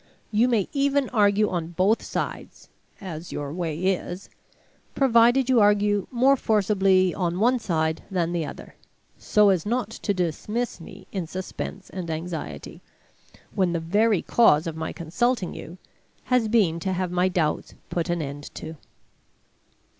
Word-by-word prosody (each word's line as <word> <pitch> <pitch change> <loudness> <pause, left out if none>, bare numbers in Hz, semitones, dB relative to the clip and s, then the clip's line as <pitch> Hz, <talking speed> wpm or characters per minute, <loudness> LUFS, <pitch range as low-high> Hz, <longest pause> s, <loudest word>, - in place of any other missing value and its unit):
You 225 +3 +3
may 225 -6 +1
even 280 -1 +1
argue 210 -2 +3
on 170 -3 -2
both 195 +6 +2
sides - - -5 0.3
(as 170 -3 -7
your 145 0 -4
way 165 -3 -3
is), 185 +1 -2 0.6
provided 240 0 +4
you 255 -3 +4
argue 205 -1 +3
more 260 +3 +4
forcibly 195 -5 +2
on 175 -1 -2
one 245 +4 +3
side 160 -6 -1
than 175 -3 -1
the 170 -2 -1
other, - - -9 0.5
so 210 -1 +4
as 185 -4 +2
not 230 0 -1
to 225 - -3
dismiss 195 +5 -2
me 185 +4 -12
in 185 -5 -3
suspense 185 +2 -6
and 180 -3 -5
anxiety, 165 +1 -6 0.7
when 185 -4 +1
the 170 - 0
very 205 +4 +2
cause 165 -10 +4
of 165 -2 -4
my 160 0 -4
consulting 190 +5 -1
you 170 +4 -9 0.5
has 250 -3 +2
been 200 -7 +2
to 190 +2 -2
have 185 -1 -2
my 180 +1 +2
doubts 170 -4 -1 0.2
put 170 0 -2
an 170 -2 0
end 145 +1 -7
to. 160 0 -7
190 Hz, 150 wpm, -25 LUFS, 170-220 Hz, 0.7 s, provided